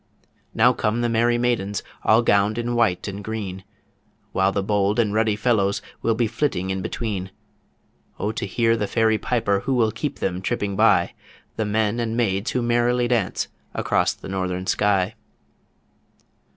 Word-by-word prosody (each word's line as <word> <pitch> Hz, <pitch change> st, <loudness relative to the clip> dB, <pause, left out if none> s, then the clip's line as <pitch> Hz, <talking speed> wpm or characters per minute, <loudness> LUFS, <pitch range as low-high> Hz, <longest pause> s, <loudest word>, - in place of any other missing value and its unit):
Now -, -, +5 dB
come 110 Hz, +3 st, -1 dB
the 120 Hz, -, +1 dB
Merry 120 Hz, +1 st, +2 dB
Maidens, 115 Hz, -5 st, -1 dB, 0.2 s
All 115 Hz, +2 st, +4 dB
gowned 100 Hz, 0 st, +2 dB
in 120 Hz, 0 st, -2 dB
white 110 Hz, -7 st, +1 dB
and 100 Hz, +1 st, -6 dB
green, 100 Hz, -4 st, -5 dB, 0.7 s
While 95 Hz, +1 st, +2 dB
the 100 Hz, 0 st, -1 dB
bold 105 Hz, +1 st, +1 dB
and 110 Hz, -4 st, +2 dB
ruddy 110 Hz, -1 st, +2 dB
fellows 105 Hz, -3 st, +1 dB, 0.2 s
Will 115 Hz, -, +1 dB
be 120 Hz, +1 st, +1 dB
flitting 110 Hz, -5 st, -1 dB
in 95 Hz, 0 st, -2 dB
between 95 Hz, -1 st, -3 dB, 0.9 s
O 105 Hz, -, -1 dB
to 105 Hz, -, -4 dB
hear 115 Hz, +3 st, +2 dB
the 105 Hz, -3 st, -2 dB
fairy 110 Hz, -1 st, +2 dB
piper 110 Hz, -5 st, 0 dB
Who 135 Hz, +6 st, -1 dB
will 115 Hz, -3 st, +2 dB
keep 145 Hz, +6 st, -4 dB
them 90 Hz, -1 st, -2 dB
tripping 100 Hz, +1 st, -2 dB
by! -, -, +3 dB, 0.4 s
The 110 Hz, -, -1 dB
men 110 Hz, +2 st, 0 dB
and 115 Hz, -1 st, -2 dB
maids 100 Hz, -1 st, 0 dB
who 125 Hz, -, -1 dB
merrily 120 Hz, +1 st, +2 dB
dance 115 Hz, -6 st, 0 dB, 0.3 s
across -, -, +1 dB
the -, -, -11 dB
Northern 95 Hz, -1 st, -3 dB
Sky. 95 Hz, +1 st, +1 dB
110 Hz, 165 wpm, -23 LUFS, 100-120 Hz, 0.9 s, Now